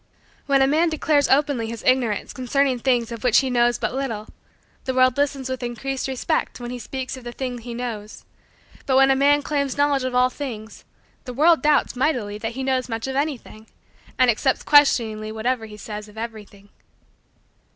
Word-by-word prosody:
When 275 -1 +4
a - - +3
man 320 +4 +2
declares 305 -2 +1
openly 275 -4 +2
his 230 0 -7
ignorance 250 -5 +1
concerning 260 0 0
things 240 -2 +1
of 230 -2 -7
which 245 -1 +5
he 265 -1 -2
knows 240 0 +2
but - - -2
little, 235 -6 -3 0.6
the 260 - -2
world 255 -1 +4
listens 280 -2 -1
with 260 0 -4
increased 255 +3 -3
respect 260 -1 -2
when 240 0 -6
he 250 - -5
speaks 260 +2 -5
of 260 - -11
the 240 - -6
thing 250 -1 -5
he 235 0 -8
knows: 225 -4 -6 0.6
but 260 -1 +3
when 270 0 +6
a - - +4
man 285 +2 +3
claims 280 -3 -1
knowledge 285 -2 +2
of 255 -1 -3
all 250 0 +3
things, 225 -6 -7 0.4
the 250 -2 -7
world 320 +4 +4
doubts 295 -3 +2
mightily 245 -7 -1
that 225 +1 -4
he 265 +2 -4
knows 260 -1 -1
much 225 -1 -3
of 265 0 -4
anything, 270 -6 -4 0.5
and 255 -2 +5
accepts 260 +4 0
questioningly 225 -7 +3
whatever 225 +1 -2
he 210 -1 -11
says 210 0 -7
of 210 +1 -17
everything. 210 -3 -8
255 Hz, 190 wpm, -22 LUFS, 230-270 Hz, 0.6 s, when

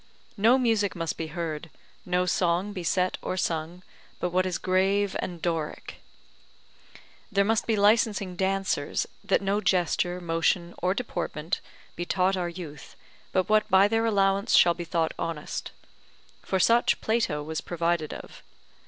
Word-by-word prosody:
No 230 +5 +5
music 225 -6 +1
must 165 -2 -2
be 160 - -4
heard, 160 0 -5 0.4
no 180 0 +1
song 180 +3 +1
be 185 -3 -5
set 185 +2 0
or 185 - -3
sung, 170 +1 -2 0.4
but 180 - -1
what 185 +1 +2
is 180 -2 -1
grave 195 +2 +1
and 175 -2 -4
Doric. 165 -3 -3 1.3
There 200 -1 +3
must 220 +1 +1
be 225 - +2
licensing 205 -2 +2
dancers, 190 -5 0 0.2
that - - +1
no 200 +2 +1
gesture, 180 -1 +1
motion, 170 +1 0
or 185 +2 +1
deportment 175 -8 -3 0.3
be 175 - -3
taught 185 +2 +1
our 175 -2 -2
youth 165 -5 -9 0.4
but 185 -1 +1
what 215 0 +3
by 190 +2 +6
their 225 +1 +1
allowance 200 0 +2
shall 175 - +6
be 175 0 -6
thought 165 -1 0
honest; 160 -3 -4 0.7
for 190 - -1
such 235 +5 +4
Plato 215 -10 0
was 160 +1 -4
provided 170 -2 -1
of. - - -10
180 Hz, 150 wpm, -27 LUFS, 170-200 Hz, 1.3 s, by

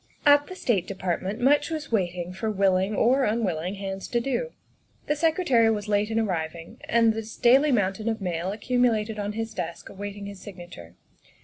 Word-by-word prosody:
At 290 0 +6
the 370 - -8
State 210 - 0
Department 190 +2 -3
much 290 +4 +3
was 315 -4 -5
waiting 180 -4 -1
for 220 +4 -3
will 195 -2 +2
ing 190 +3 0
or 260 +6 +3
unwilling 195 -6 -1
hands 195 -1 -5
to 240 - 0
do. 275 - -2 0.6
The 295 - 0
Secretary 300 -7 +3
was 210 -1 -1
late 205 0 +1
in 225 0 0
arriving, 170 -5 -3
and 230 -1 +4
the 225 - -3 0.2
daily 270 +5 +5
mountain 210 -1 0
of 225 -1 -2
mail 180 -1 -2
accumulated 225 -1 0
on 205 0 -3
his 225 0 -4
desk 170 -2 -5
awaiting 205 +1 -7
his 200 -1 -8
signature. 175 - -11
210 Hz, 180 wpm, -26 LUFS, 190-235 Hz, 0.6 s, At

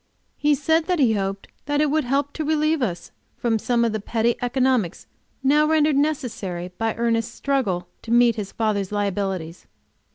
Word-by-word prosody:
He 295 0 +2
said 320 +4 +1
he 245 -6 +4
hoped 195 -1 -3 0.2
that 290 0 +1
it 300 -1 +2
would 310 -1 +1
help 275 +3 0
to 315 - -3
relieve 310 0 +1
us 180 -8 -3 0.3
from 225 -2 0
some 235 +1 +1
of 230 - +1
the 215 - -2
petty 230 +3 0
economies 250 -6 0 0.4
now 295 +3 +4
rendered 310 -2 +3
necessary 225 - -2
by 225 -1 0
Ernest's 230 0 0
struggle 205 -11 -1
to - - -11
meet 235 0 +5
his 205 -3 -5
father's 210 -4 -1
liabilities. 195 -4 -3
235 Hz, 165 wpm, -23 LUFS, 205-285 Hz, 0.4 s, meet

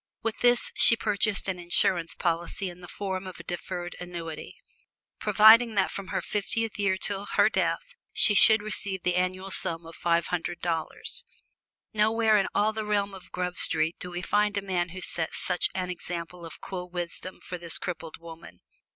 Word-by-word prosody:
With 225 -1 -2
this 245 0 +4
she 230 - +7
purchased 210 -2 0
an 185 -2 -2
insurance 175 -1 +1
policy 175 +2 -1
in 175 +1 -15
the 175 - -10
form 190 0 -4
of 185 - -9
a - - -9
deferred 175 0 -5
annuity, 170 -3 -7 0.6
providing 220 +2 +6
that 195 -2 +2
from 200 -1 -6
her - - -2
fiftieth 215 +1 -2
year 195 -2 +1
to 200 0 -1
her - - +3
death - - -1 0.2
she 210 - +4
should 215 +1 +6
receive 200 -3 0
the 180 - +1
annual 185 +1 -1
sum 165 -2 0
of 165 - -11
five 170 -1 +1
hundred 175 0 -2
dollars. 165 -2 -3 0.7
Nowhere 220 +1 +3
in 195 - 0
all 215 +1 +2
the 220 0 -3
realm 205 -1 0
of 190 -2 -12
Grub 180 0 -3
Street 160 +1 +1
do 180 - -6
we 175 0 -5
find 210 +2 +1
a 200 - -1
man 180 -2 -1
who 185 +2 -8
set 165 -2 -1
such 180 - 0
an 180 -1 -2
example 170 -1 -6
of 165 - -12
cool 180 -2 -6
wisdom 175 +1 -5
for 180 - -7
this 170 -1 -2
crippled 165 -2 -6
woman. 165 0 -12
185 Hz, 185 wpm, -27 LUFS, 175-205 Hz, 0.7 s, she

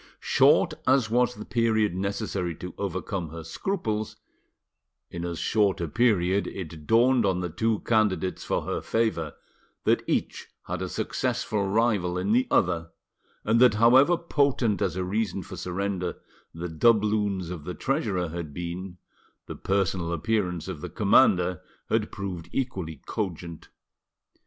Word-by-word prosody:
Short - - +4
as 130 -4 +3
was 125 +1 +2
the 105 - -8
period 110 -4 +1
necessary 95 -3 -2
to 90 +2 -8
overcome 95 -2 -3
her 80 +1 -8
scruples, 110 - -3 1.0
in 85 0 -5
as 85 -1 -3
short 105 0 +1
a 85 - -2
period 100 -2 +2
it 80 -5 -7
dawned 120 +2 +4
on 95 -3 +1
the 90 -2 -3
two 110 +4 0
candidates 100 -5 +1
for - - -1
her - - -3
favour 110 -9 -1 0.5
that - - +3
each - - -1 0.2
had - - -4
a - - -3
successful 100 -2 -1
rival 100 -4 +1
in 95 +3 -1
the 125 +3 +3
other, 85 -2 +1 0.6
and 110 +2 +3
that 125 -4 +6
however 130 +10 +6
potent 140 -10 +1
as 90 -4 0
a 95 - -1
reason 100 0 -2
for 95 - -9
surrender 90 +1 -3 0.4
the 85 +2 -5
doubloons 105 0 +2
of 85 -5 -6
the 90 - -5
treasurer 105 - -1
had 80 -3 -6
been, 90 +1 -5 0.5
the - - -6
personal 95 -3 -1
appearance 90 -1 -1
of - - -6
the - - -5
commander 90 -1 +3 0.3
had - - +1
proved 95 -4 -6
equally 95 - -3
cogent. 85 -4 -5
95 Hz, 145 wpm, -26 LUFS, 90-110 Hz, 1.0 s, that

